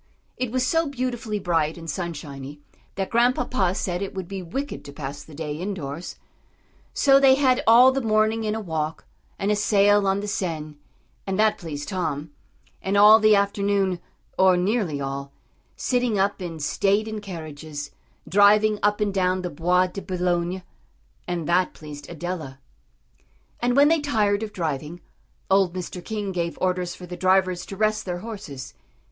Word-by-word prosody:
It 255 -2 -2
was 255 0 +1
so 325 -1 +2
beautifully 250 -5 -3
bright 165 -5 0
and 165 -1 -9
sunshiny, 145 -4 -6 0.4
that 195 -1 -3
Grandpapa 240 -5 +2
said 180 -1 -2
it 195 - -4
would 190 -2 -4
be 195 0 -5
wicked 270 +12 -5
to 140 - -8
pass 145 -1 -6
the 155 - -14
day 150 -1 -4
indoors; 170 -3 -5 0.8
so 275 -1 +5
they 270 -1 +6
had 260 -2 +3
all 245 +3 +8
the 270 +1 -1
morning 220 0 +2
in 215 0 -1
a - - -2
walk, 160 -5 -3 0.3
and 200 +2 0
a - - +3
sail 205 -1 +3
on 195 +1 +2
the 205 - -4
Seine, 160 -6 -3 0.5
and 190 -1 -1
that 215 0 +3
pleased 145 -4 -6
Tom, 160 -6 -3 0.5
and 195 +1 0
all 210 +2 +9
the 215 -1 +5
afternoon, 200 -2 +1 0.4
or 190 -1 +5
nearly 185 -5 0
all, 140 0 -4 0.4
sitting 245 -4 0
up 195 +1 0
in 165 -3 -5
state 200 +8 +1
in 220 -1 -5
carriages, 155 -5 -7 0.4
driving 210 +2 +5
up 205 +1 +1
and 205 -2 +1
down 185 -1 +1
the 180 - -3
Bois 180 +4 +2
de 185 +2 -6
Boulogne. 180 -1 -1 0.6
And 175 -3 -3
that 180 +1 +2
pleased 145 -2 -10
Adela. 170 -5 -5 1.0
And 245 0 +1
when 285 +1 +6
they 330 0 +3
tired 215 -8 +1
of 220 -1 -4
driving, 160 -2 -4 0.5
old 190 -2 +3
Mr. 180 0 -6
King 210 -3 -3
gave 170 -2 -2
orders 180 -1 -1
for 180 - -10
the 180 0 -7
drivers 185 0 +2
to 195 - -7
rest 215 0 +1
their 175 -1 -3
horses. 150 - -8
190 Hz, 165 wpm, -24 LUFS, 165-215 Hz, 1.0 s, all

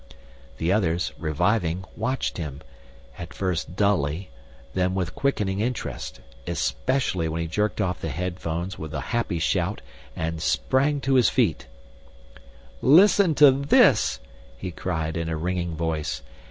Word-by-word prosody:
The 85 +3 0
others, 90 -4 +1
reviving, 90 +3 0
watched 125 +5 -2
him, 70 -4 -5 0.6
at 85 -3 -8
first 90 -3 -2
dully, 90 -5 0 0.4
then 90 0 0
with 90 -3 -2
quickening 105 -8 0
interest, 120 +3 -4 0.3
especially 85 - 0
when 80 +1 -3
he 85 - -2
jerked 105 +7 -1
off 95 -3 -1
the - - -3
earphones 85 +2 -4
with 80 0 -6
a - - -1
happy 115 -7 0
shout 80 - 0 0.3
and 80 0 -3
sprang 140 - +1
to 135 0 +1
his 125 -3 +5
feet. - - +1 1.1
"Listen 180 +2 +6
to 145 -1 +8
this!" 130 - +4 0.4
he 90 +8 -5
cried 80 -2 -3
in 85 -1 -2
a 80 - -2
ringing 85 0 -2
voice. 80 -2 -2
90 Hz, 135 wpm, -25 LUFS, 80-110 Hz, 1.1 s, to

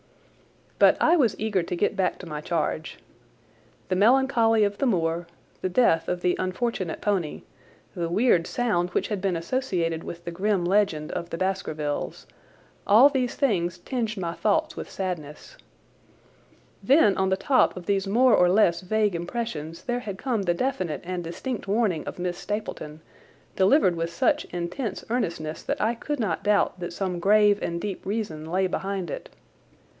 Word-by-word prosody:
But - - +6
I 330 - +5
was 265 -9 +2
eager 210 -4 0
to 175 +1 -4
get 170 - 0
back 185 -1 0
to - - -10
my 150 -3 -5
charge. 155 -1 -2 0.9
The 185 - +1
melancholy 225 0 +4
of 200 0 -1
the 275 - +2
moor, 170 -5 0 0.3
the 185 - -1
death 175 -6 +3
of 180 0 -2
the 180 0 +2
unfortunate 185 -2 -2
pony, 190 -7 -1 0.5
the 170 -2 -3
weird 175 -3 +3
sound 205 -8 0
which - - -1
had 205 -3 -2
been 190 -2 0
associated 170 -4 -1
with 170 0 -8
the 170 - -4
grim 190 +1 0
legend 180 -5 +1
of 170 - -4
the 165 - -4
Baskervilles, 160 -6 -3 0.6
all 230 +8 +8
these 255 -3 -1
things 180 - 0
tinged 225 +3 -3
my 170 -3 -3
thoughts 310 - 0
with - - -7
sadness. 180 - -6 1.3
Then 260 -8 +5
on 190 0 +1
the 190 - +1
top 255 +1 +2
of 180 - -8
these 195 -1 0
more 240 +4 +4
or 180 - +5
less 180 -3 +3
vague 210 +1 +1
impressions 170 -3 -4
there 245 -1 -1
had 200 -5 -6
come 240 -2 -1
the 175 -3 0
definite 185 - -2
and 180 0 -4
distinct 205 +7 -5
warning 200 -6 0
of - - -6
Miss 175 0 -3
Stapleton, 160 -7 -5 0.5
delivered 190 - +4
with 165 0 -3
such 170 - +1
intense 180 +6 -4
earnestness 170 -10 -2
that - - -3
I 225 +2 +1
could 290 +5 -4
not 205 -8 -1
doubt 205 -3 +2
that 175 - -5
some 180 0 -3
grave 205 +2 +4
and 170 0 -2
deep 195 0 -5
reason 190 -7 -4
lay 190 +1 +2
behind 190 -2 -3
it. - - -6
190 Hz, 170 wpm, -25 LUFS, 170-220 Hz, 1.3 s, all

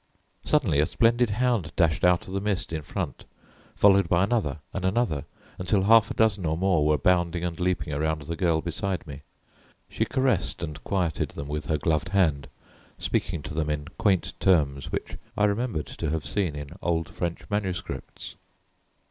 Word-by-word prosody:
Suddenly 110 - +2
a 75 - +3
splendid 120 +1 +3
hound 110 -6 0
dashed 80 -3 +2
out 90 -1 +3
of 95 - -7
the 100 - -1
mist 100 -5 -1
in 80 - -2
front, 75 - -5 0.5
followed 100 -3 +5
by 85 +2 +3
another 100 - 0
and 95 - -3
another 95 - 0 0.3
until 95 +2 +1
half 110 +1 +6
a - - -4
dozen 110 -4 +2
or 80 -1 0
more 90 -4 +2
were 75 0 +3
bounding 85 +2 +1
and 85 0 -3
leaping 90 -4 -1
around 80 +1 -1
the 85 +3 -4
girl 80 -1 +1
beside 90 +3 -2
me. 70 -2 -9 0.7
She - - -1
caressed 130 -8 0
and 75 -3 -6
quieted 90 -6 -1
them 70 - -7
with 75 0 -4
her 80 - +1
gloved 80 +4 0
hand, 85 -8 +2 0.5
speaking 80 -4 -2
to - - -6
them 75 0 -1
in 75 0 -3
quaint 95 -4 +2
terms 70 -7 +2
which - - -4 0.2
I 105 - +2
remembered 105 -5 -1
to 80 - -4
have 80 0 -2
seen 90 -7 -1
in 75 -1 -6
old 80 -2 0
French 85 +2 -4
manuscripts. 95 -8 -4
85 Hz, 175 wpm, -26 LUFS, 75-100 Hz, 0.7 s, half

